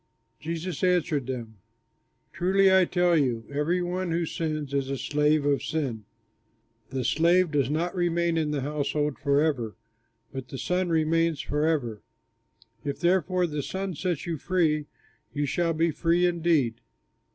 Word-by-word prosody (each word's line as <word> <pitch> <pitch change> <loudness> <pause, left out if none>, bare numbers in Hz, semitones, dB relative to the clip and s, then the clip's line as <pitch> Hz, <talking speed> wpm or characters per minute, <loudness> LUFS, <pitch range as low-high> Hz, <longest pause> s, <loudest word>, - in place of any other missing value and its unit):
Jesus 165 +1 -4
answered 170 -7 +1
them, 115 -4 -5 0.8
"Truly, 190 +2 +3
I 190 -1 +6
tell 175 -1 +2
you, 125 -7 +1
every 160 +5 0
one 180 +1 -2
who 165 +1 0
sins 155 -3 -3
is 135 -1 0
a 135 - -2
slave 150 +1 +1
of 145 -1 +2
sin. 130 -9 -3 0.8
The 130 -1 -2
slave 170 +3 +3
does 140 -3 +1
not 165 +4 -1
remain 170 -1 +1
in 160 -2 0
the 150 -2 -1
household 145 0 -1
forever, 140 -6 +1 0.6
but 135 -1 -6
the 135 - -7
Son 180 +5 0
remains 165 0 +2
forever. 145 -8 -1 0.8
If 140 -2 -3
therefore 180 0 +2
the 150 -3 -3
Son 190 +5 -4
sets 175 -1 -2
you 165 -4 -3
free, 155 -3 +1 0.5
you 145 0 0
shall 170 +3 0
be 165 +1 +1
free 170 +3 +2
indeed. 165 -9 +1
155 Hz, 145 wpm, -27 LUFS, 140-175 Hz, 0.8 s, I